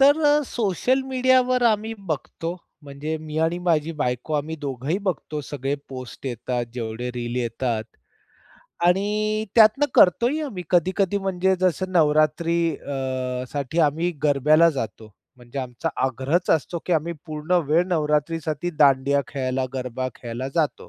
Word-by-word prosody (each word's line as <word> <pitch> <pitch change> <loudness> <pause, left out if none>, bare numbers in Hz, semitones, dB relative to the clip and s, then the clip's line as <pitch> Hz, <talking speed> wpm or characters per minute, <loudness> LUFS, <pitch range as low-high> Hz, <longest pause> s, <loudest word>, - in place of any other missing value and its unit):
तर 295 +1 +5
सोशल 240 +5 0
मीडियावर 255 -1 +3
आम्ही 220 +2 -3
बघतो 165 +3 -4 0.3
म्हणजे 145 +3 -4
मी 155 0 -5
आणि 165 +2 +1
माझी 165 -2 +1
बायको 125 +4 -2
आम्ही 155 +2 -2
दोघंही 140 +4 -2
बघतो 180 -6 -3
सगळे 140 -1 -3
पोस्ट 130 0 -8
येतात 120 0 -2
जेवढे 120 +1 -4
रील 120 0 -4
येतात. 115 -1 -1 1.0
आणि 210 +3 +1
त्यातनं 225 +6 +6
करतोही 240 - +4
आम्ही 205 -11 -5
कधी-कधी 185 +3 +2
म्हणजे 190 -1 +1
जसं 185 +1 0
नवरात्री 155 +1 +3 0.2
अ 130 -2 -3
साठी 145 +2 -3
आम्ही 160 +4 +2
गरब्याला 155 +3 +5
जातो. 110 -5 -6 0.2
म्हणजे 120 +2 -9
आमचा 130 +5 -3 0.2
आग्रहच 135 +7 0
असतो, 165 +2 +1
की 180 - 0
आम्ही 165 +1 +1
पूर्ण 155 +2 -4 0.2
वेळ 165 +4 +4
नवरात्रीसाठी 155 0 0
दांडिया 140 -1 +4
खेळायला, 130 -1 -1
गरबा 130 0 -3
खेळायला 120 +2 -5
जातो. 160 -4 -1
155 Hz, 130 wpm, -23 LUFS, 130-180 Hz, 1.0 s, त्यातनं